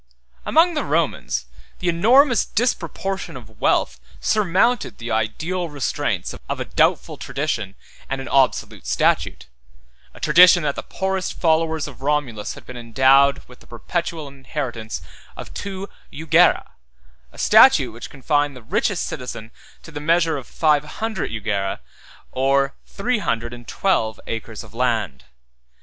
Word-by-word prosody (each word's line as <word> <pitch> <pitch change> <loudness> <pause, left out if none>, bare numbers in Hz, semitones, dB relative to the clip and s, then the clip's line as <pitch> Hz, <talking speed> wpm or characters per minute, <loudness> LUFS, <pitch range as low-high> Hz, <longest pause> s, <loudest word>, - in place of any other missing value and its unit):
Among 340 +2 +4
the 300 - -1
Romans, - - -1 0.3
the 180 - -4
enormous 235 - +4
disproportion 195 - -2
of 110 -3 -15
wealth 65 -1 +1 0.2
surmounted 215 +4 +1
the 115 0 -6
ideal 155 +12 -2
restraints 145 -4 -2 0.2
of - - -2
a - - -3
doubtful - - +1
tradition, 120 -9 -3 0.3
and 135 - -2
an 135 - -6
obsolete 130 - +1
statute; 60 -1 +1 0.7
a - - -12
tradition 175 +2 +6
that 145 -1 0
the - - -4
poorest 190 -1 -3
follower 160 -1 +2
of 145 -4 -6
Romulus 135 -7 -1
had - - -13
been 125 - -9
endowed 130 +4 +4
with 125 - -16
the - - -19
perpetual 160 +5 -4
inheritance 130 -5 -5 0.3
of - - -9
two 195 -1 -5 0.2
jugera; 160 +3 +3 0.6
138 - - -31
a - - -16
statute - - +6
which - - -9
confined 145 +1 0
the 125 - -12
richest - - 0
citizen 115 -3 -7 0.3
to 165 - -12
the 145 - -6
measure 165 +1 +2
of 135 -4 -6
five 150 -2 +2
hundred 215 +5 -4
jugera, 100 -3 -2 0.5
or 135 +1 +1
three 240 +3 -1
hundred 120 - -2
and 120 -1 -11
twelve 115 - 0
acres 110 -1 -6
of - - -16
land. 110 - -1
145 Hz, 140 wpm, -21 LUFS, 120-175 Hz, 0.7 s, tradition